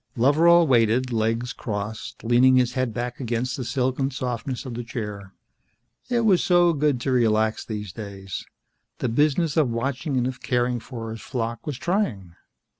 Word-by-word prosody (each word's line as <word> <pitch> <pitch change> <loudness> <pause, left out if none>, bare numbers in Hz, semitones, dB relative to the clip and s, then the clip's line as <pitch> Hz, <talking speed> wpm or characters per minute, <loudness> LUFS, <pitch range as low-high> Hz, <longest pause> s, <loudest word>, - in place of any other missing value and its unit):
Loveral 165 +7 +5
waited, 120 0 +3
legs 115 +2 0
crossed, 105 0 -5
leaning 120 +3 +5
his 125 -1 +3
head 130 -2 -1
back 120 +2 -4
against 125 0 -2
the 130 - -4
silken 130 +2 0
softness 125 0 -4
of 130 - -5
the 120 +1 -4
chair. 105 -4 -6 0.7
It 240 -1 +2
was 200 -6 +4
so 175 -1 +4
good 145 -3 +1
to 135 - -1
relax 110 -3 +2
these 105 -4 -6
days. 100 -3 -7 0.5
The 125 - -1
business 150 +5 +1
of 150 -5 +3
watching 130 +4 -2
and 125 - +1
of 130 0 -4
caring 125 -1 0
for 115 -2 -7
his 110 - -7
flock 115 -1 -4
was 145 -5 -3
trying. 170 - -1
125 Hz, 165 wpm, -24 LUFS, 115-135 Hz, 0.7 s, Loveral